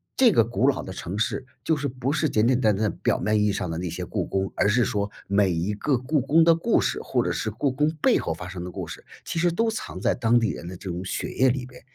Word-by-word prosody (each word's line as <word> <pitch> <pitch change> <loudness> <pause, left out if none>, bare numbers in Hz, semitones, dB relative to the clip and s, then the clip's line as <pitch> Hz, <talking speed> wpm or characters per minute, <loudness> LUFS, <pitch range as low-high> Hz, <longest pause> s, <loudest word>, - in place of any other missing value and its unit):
这 250 -4 +6
个 115 - +5
古 120 +2 +1
老 135 - 0
的 95 - -7
城 95 +1 -5
市， 130 +3 -1 0.2
就 160 - +2
是 145 -1 -2
不 130 +1 -3
是 155 0 +1
简 110 0 +2
简 130 -1 +3
单 110 -4 +3
单 105 +1 0
表 - - +1
面 105 0 +1
意 105 - +3
义 - - +2
上 90 -3 -3
的 80 - -3
那 90 +1 -3
些 85 - -5
故 - - -2
宫， 95 0 -2
而 - - +2
是 115 +2 +3
说 100 0 -1 0.2
每 100 -1 +3
一 85 +5 -1
个 130 +5 0
故 130 +3 0
宫 160 +5 +4
的 165 0 +6
故 165 - +2
事 - - -1
或 - - 0
者 - - -1
是 110 - -2
故 130 +6 0
宫 150 +4 +1
背 - - +4
后 80 - -2
发 90 +2 -8
生 90 -1 -6
的 90 - -6
故 - - -6
事， - - -9 0.2
其 - - -4
实 175 +1 +3
都 225 +7 +1
藏 215 - -5
在 - - +2
当 120 0 +3
地 115 -2 +1
人 85 - -8
的 90 - -6
这 95 - -7
种 90 +1 -4
血 - - -3
液 130 0 +3
里 125 0 -1
边。 125 0 -14
115 Hz, 315 characters per minute, -25 LUFS, 95-135 Hz, 0.2 s, 这